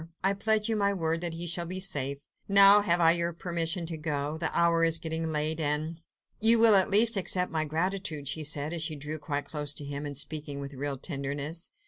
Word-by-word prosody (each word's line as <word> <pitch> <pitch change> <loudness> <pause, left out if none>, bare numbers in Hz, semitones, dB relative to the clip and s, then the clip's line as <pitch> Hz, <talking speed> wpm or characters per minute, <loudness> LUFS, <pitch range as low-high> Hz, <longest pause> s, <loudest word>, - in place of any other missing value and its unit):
I 195 +1 +2
pledge 215 +2 0
you 225 - -1
my 200 -1 0
word 165 -2 -2
that 170 -2 -4
he 170 +1 -3
shall 170 0 -2
be 185 +2 -4
safe. 140 -6 -3 0.2
Now, 200 +1 +8
have 175 -4 +2
I 165 -1 +5
your 170 0 0
permission 170 0 -3
to 165 -1 -6
go? 150 -1 -3
The 160 0 -2
hour 170 -1 +2
is 165 0 +4
getting 160 0 -4
late, 155 0 -1
and.. 155 +2 -2 0.2
." - - -51
"You 225 +1 +5
will 225 -1 +6
at 190 -2 +5
least 215 +2 +5
accept 180 0 0
my 160 -1 -1
gratitude?" 160 -2 -3
she 155 - -1
said, 150 +1 -2
as 170 - -3
she 160 -1 -2
drew 150 +2 -6
quite 145 -1 -4
close 145 -1 -3
to 145 - -6
him, 145 +1 -5
and 145 -2 -6
speaking 145 -1 -5
with 140 0 -8
real 140 +1 -4
tenderness. 145 +3 -4
165 Hz, 225 wpm, -28 LUFS, 150-180 Hz, 0.2 s, Now